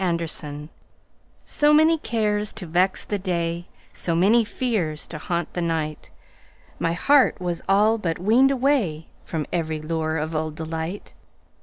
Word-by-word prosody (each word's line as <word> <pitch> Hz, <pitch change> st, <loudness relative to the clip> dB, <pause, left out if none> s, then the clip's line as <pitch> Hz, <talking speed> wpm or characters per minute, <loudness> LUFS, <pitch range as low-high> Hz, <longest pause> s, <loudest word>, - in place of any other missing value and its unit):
Summer 180 Hz, -2 st, +1 dB
Magic 150 Hz, -1 st, -5 dB, 0.8 s
SO 295 Hz, 0 st, +3 dB
many 320 Hz, +2 st, +5 dB
cares 210 Hz, -4 st, -1 dB
to 215 Hz, -5 st, -5 dB
vex 180 Hz, +3 st, +1 dB
the 205 Hz, -, -2 dB
day, 170 Hz, -2 st, -2 dB, 0.3 s
So 170 Hz, -, -1 dB
many 210 Hz, +7 st, +4 dB
fears 210 Hz, -10 st, -2 dB
to -, -, -7 dB
haunt 170 Hz, -2 st, -3 dB
the 175 Hz, -, -2 dB
night, 160 Hz, -2 st, -2 dB, 0.7 s
My 165 Hz, -, 0 dB
heart 270 Hz, +7 st, +4 dB
was 175 Hz, -2 st, -3 dB
all 210 Hz, +3 st, +4 dB
but 165 Hz, -5 st, -2 dB
weaned 230 Hz, +9 st, +4 dB
awayFrom 200 Hz, -, -1 dB
every 160 Hz, -2 st, -1 dB
lure 160 Hz, 0 st, -2 dB
of 155 Hz, +1 st, -3 dB
old 155 Hz, 0 st, -2 dB
delight. 160 Hz, +4 st, -5 dB
175 Hz, 145 wpm, -23 LUFS, 160-215 Hz, 0.8 s, many